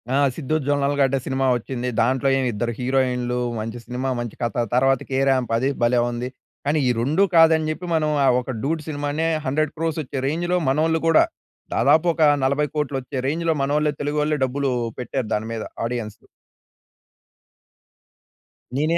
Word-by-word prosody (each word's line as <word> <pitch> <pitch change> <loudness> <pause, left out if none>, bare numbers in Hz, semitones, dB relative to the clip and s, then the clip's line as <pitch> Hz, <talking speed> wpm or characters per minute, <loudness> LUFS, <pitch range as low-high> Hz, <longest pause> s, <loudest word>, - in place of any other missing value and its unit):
ఆ! - - +3 0.2
'సిద్దు 155 -1 -2
జొన్నలగడ్డ' 140 -1 +2
సినిమా 135 0 0
వచ్చింది. 125 +1 -3
దాంట్లో 130 +3 +1
ఏమి 130 -1 0
ఇద్దరు 115 +3 -2
హీరోయిన్‌‌లు 125 -1 0 0.2
మంచి 115 +2 -5
సినిమా, 125 +2 -3
మంచి 120 -3 -5
కథ 120 0 0
తర్వాత 135 +1 +3
'కేరాంప్' 130 -2 +1
అది 130 +4 +1
భలే 120 +1 +3
ఉంది. 120 +1 -4 0.4
కానీ 150 +2 +2
ఈ - - +3
2 155 +11 +2
కాదని 160 -1 +5
చెప్పి 180 +3 -6
మనం 155 -1 +1 0.2
ఆ! - - +4
ఒక 125 0 -5
'డూడ్' 155 +2 -2
సినిమానే 145 +2 -2 0.2
100,00,00,000 155 +3 -1
వచ్చే 140 +1 -6
రేంజ్‌లో 175 +4 0
మనోళ్ళు 160 +3 +1
కూడా 165 - +6 0.5
దాదాపు 160 +2 +4
ఒక 160 - +1 0.2
40,00,00,000 145 0 0
వచ్చే 130 +2 -7
రేంజ్‌లో 165 +2 0
మనోళ్లే 150 +2 +1
తెలుగువాళ్లే 150 +1 0
డబ్బులు 135 +1 -1 0.3
పెట్టారు 125 -1 -3
దాని 110 +1 -3
మీద 110 -1 -4 0.2
ఆడియన్స్. 115 -3 -4 2.5
నేనే 155 +4 +2
135 Hz, 145 wpm, -22 LUFS, 125-155 Hz, 2.5 s, కూడా